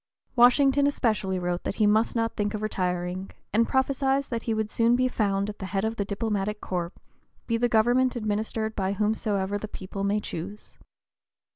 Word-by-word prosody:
Washington 270 +3 +5
especially 215 -9 0
wrote 175 0 -2
that - - -3
he 215 - +2
must 215 +3 +3
not 230 0 0
think 205 +1 -1
of 215 - -4
retiring, 180 -2 -2 0.2
and 230 +2 +3
prophesied 270 +1 +1
that 230 -1 -1
he 230 - -1
would 215 -1 -2
soon 230 +1 +3
be 255 +1 +2
"found 200 -5 0
at 210 - -7
the 190 - -5
head 195 +3 -1
of 225 +1 -2
the 200 - -1
diplomatic 210 0 -2
corps, 175 -2 -3 0.5
be 230 - 0
the 240 +1 +1
government 245 +3 +3
administered 220 0 -2
by 195 -1 0
whomsoever 205 -1 0
the 215 - -5
people 195 0 -6
may 200 +1 +1
choose." 200 +2 -7
215 Hz, 180 wpm, -26 LUFS, 195-230 Hz, 0.5 s, Washington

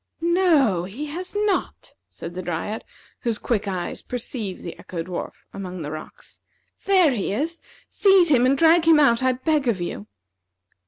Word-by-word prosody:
"No 320 - +3
he 230 +11 -6
has 355 +7 -6
not," 405 -4 -2
said 170 - -9
the 185 - -5
Dryad, 175 +5 -4 0.4
whose 230 -3 -1
quick 210 -3 -1
eyes 185 -3 -3
perceived 230 -5 -5
the 170 - -8
Echo 170 -2 -5
dwarf 180 0 -5 0.2
among 185 -3 -6
the 150 - -5
rocks. 155 0 -10 0.4
"There 370 -6 +5
he 215 -7 -2
is. 315 +10 -2 0.3
Seize 385 -4 +4
him 255 -4 +4
and 275 +1 +3
drag 325 +2 +5
him 320 -2 +7
out, 235 -5 +4
I 260 0 +3
beg 275 +2 0
of 220 -6 +1
you." 110 -12 -5
250 Hz, 165 wpm, -23 LUFS, -, 0.4 s, him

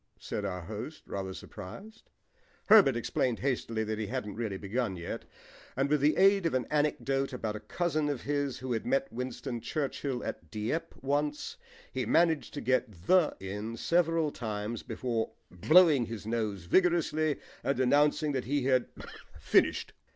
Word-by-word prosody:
said 105 - -4
our 90 -2 -3
host, 110 - -7
rather 95 -1 -4
surprised. 200 - -10 0.6
Herbert 200 - +8
explained 120 0 0
hastily 115 -4 -1
that 110 0 -3
he 110 - -2
hadn't 105 -3 -3
really 110 -4 -3
begun 105 +1 -2
yet, 85 - -5 0.5
and 140 +2 +1
with 150 -2 +3
the 150 +2 +3
aid 195 -1 +5
of 160 - -1
an 130 - +1
anecdote 135 -2 0
about 110 -4 -3
a - - -4
cousin 155 -1 -1
of 140 -4 -3
his 145 -2 -1
who 130 -1 -5
had 115 - 0
met 275 +2 0
Winston 125 -1 -4
Churchill 140 -3 -2
at 80 - -6
Dieppe 115 - -3
once, 145 - -1 0.4
he - - -2
managed 165 -5 +2
to 145 - -3
get 130 -2 +1
"the" 180 - +4
in 105 +4 -5
several 165 -1 +2
times 110 -1 -4
before 115 -3 -2 0.2
blowing 150 - +5
his 115 -2 -6
nose 110 -5 -2
vigorously 155 - +2 0.2
and 140 - 0
announcing 145 +3 +3
that 130 -2 -2
he 140 +1 0
had 130 -1 +2 0.5
finished. - - +2
130 Hz, 160 wpm, -30 LUFS, 110-150 Hz, 0.6 s, Herbert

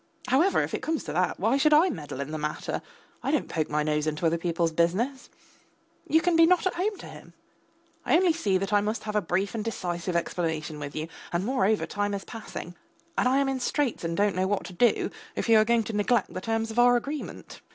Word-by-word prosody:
However, 315 +10 +4
if - - -5
it - - -2
comes 320 -1 -2
to 150 - -5
that, 180 +2 0
why 225 +7 +2
should 305 +2 +5
I 335 +5 +5
meddle 145 -5 -6
in 140 +2 -5
the 155 - -3
matter? 150 0 -3 0.4
I - - -2
don't - - +1
poke 155 -2 -2
my 150 0 0
nose 150 0 0
into 155 +2 -2
other 165 +1 +2
people's 170 -1 0
business. 195 - 0 0.8
You 320 - +4
can 355 0 +2
be 330 0 +7
not 365 +1 +3
at 375 - +1
home 395 +3 -1
to - - -10
him; - - -12 0.7
I - - +3
only 360 -2 +3
see 205 - +1
that 195 +2 -3
I 205 - +5
must 215 +2 -2
have 210 -1 -4
a 210 - +3
brief 190 +3 -1
and 225 -2 -3
decisive 180 -5 -3
explanation 160 -3 -2
with 145 -1 -6
you, 155 +1 -3 0.2
and, 175 +2 -1
moreover, 220 -4 +1
time 205 0 -2
is 195 - -6
passing. 220 -6 -8 0.4
And - - +2
I 260 +2 +3
am 275 0 +2
in 270 -1 -1
straits 255 - -1
and 165 0 -2
don't 205 -1 +2
know 185 +1 +1
what 205 0 0
to 185 - -9
do 235 +7 +2 0.2
if - - -2
you 225 -1 +6
are 215 - +4
going 235 0 +3
to 220 - -6
neglect 210 +1 +1
the 185 - -4
terms 225 +1 -1
of 230 - -1
our 245 0 +6
agreement. 280 +5 -5
205 Hz, 240 wpm, -27 LUFS, 170-255 Hz, 0.8 s, be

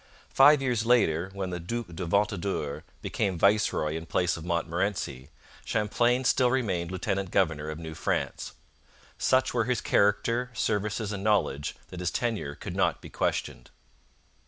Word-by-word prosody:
Five 140 +1 +7
years 120 -5 +1
later, 95 -8 +3
when 95 -2 -4
the 90 - -3
Duc 115 +8 -4
de 90 +1 -4
Ventadour 95 -6 -1 0.2
became 95 -5 -1
viceroy 100 -5 +2
in 80 0 -6
place 90 +2 +1
of 80 - -8
Montmorency, 85 -5 -2 0.3
Champlain 120 +4 +1
still 125 -1 +3
remained 95 -10 0
lieutenant 95 +1 -2
general 80 -6 +1
of 75 - -6
New 80 -1 -7
France. 80 - -2 0.7
Such 130 0 +2
were 120 -2 +1
his 125 -1 0
character, 115 +5 +2
services, 105 -2 -1
and 100 -2 -4
knowledge 100 -9 +1
that 90 - -8
his 90 -1 0
tenure 110 -13 -2
could - - -7
not - - +1
be - - -12
questioned. - - -2
100 Hz, 150 wpm, -28 LUFS, 85-115 Hz, 0.7 s, Five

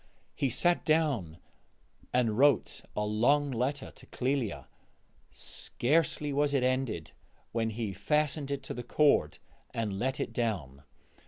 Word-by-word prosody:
He 135 - 0
sat 175 +8 +2
down 140 - +1 0.7
and 120 -4 +2
wrote 140 -1 +3
a 105 - 0
long 135 +7 +2
letter 130 +4 -2
to - - -15
Clélia; 125 - -1 0.6
scarcely 150 +1 0
was 145 0 +2
it 130 - +2
ended 130 - -1 0.4
when 115 -1 0
he 110 -2 -3
fastened 150 - 0
it 140 -1 -3
to - - -5
the 125 - -5
cord 120 - +3 0.4
and 105 -4 -2
let 130 +2 -1
it - - -3
down. 85 - -2
125 Hz, 135 wpm, -30 LUFS, 110-145 Hz, 0.7 s, wrote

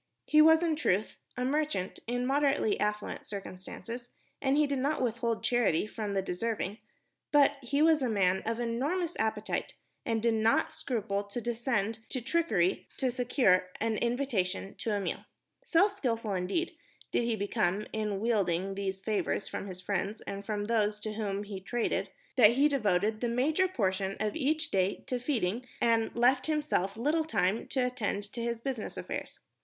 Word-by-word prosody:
He 305 0 +6
was, 320 +2 +7
in 325 -2 +2
truth, 210 - 0 0.2
a 250 - 0
merchant 295 -9 -1
in 245 +1 -1
moderately 275 -5 +2
affluent 210 0 -2
circumstances, 210 +5 -7 0.3
and 275 0 +2
he 300 - +5
did 280 -2 -1
not 285 +4 0
withhold 235 -2 -1
charity 235 -8 +2
from 215 -2 -4
the 195 - +1
deserving; 205 +2 -2 0.5
but 285 -1 +5
he 280 +4 +1
was 320 -2 +5
a 255 - +1
man 190 -3 +2
of 230 +1 -1
enormous 290 +10 -1
appetite 220 -1 -1 0.3
and 225 -2 0
did 235 -1 +3
not 220 +1 +2
scruple 205 -5 -2
to 205 +4 -4
descend 230 -2 -1
to 260 - -1
trickery 235 - +1
to 260 -2 +1
secure 240 -7 +3
an 225 0 0
invitation 235 -7 -1
to 225 - -1
a - - 0
meal. 195 - -3 0.4
So 390 -5 +4
skilful, 230 - -2
indeed, 195 - -1 0.4
did - - +2
he 235 -1 +1
become 205 -1 0
in 210 -2 -1
wheedling 195 -4 +1
these 195 -1 -3
favors 210 0 -1
from 200 - -5
his 185 -1 -7
friends 200 +2 -2
and 200 0 -6
from 205 0 -2
those 210 -1 0
with 215 - -2
whom 205 -2 -2
he 200 -2 -6
traded, 235 +5 -1 0.3
that 230 -2 +8
he 280 +4 +5
devoted 215 -6 +1
the 240 - +1
major 300 +10 +2
portion 195 - -1
of 215 0 -1
each 310 +1 0
day 190 0 +1
to 255 -3 -2
feeding 245 -3 -1
and 230 -1 +2
left 250 +3 +3
himself 295 - 0
little 300 +7 +2
time 210 - 0
to 265 - 0
attend 220 -5 -2
to 235 - -4
his 235 -1 -2
business 255 -4 -4
affairs. - - -5
230 Hz, 170 wpm, -30 LUFS, 200-265 Hz, 0.5 s, that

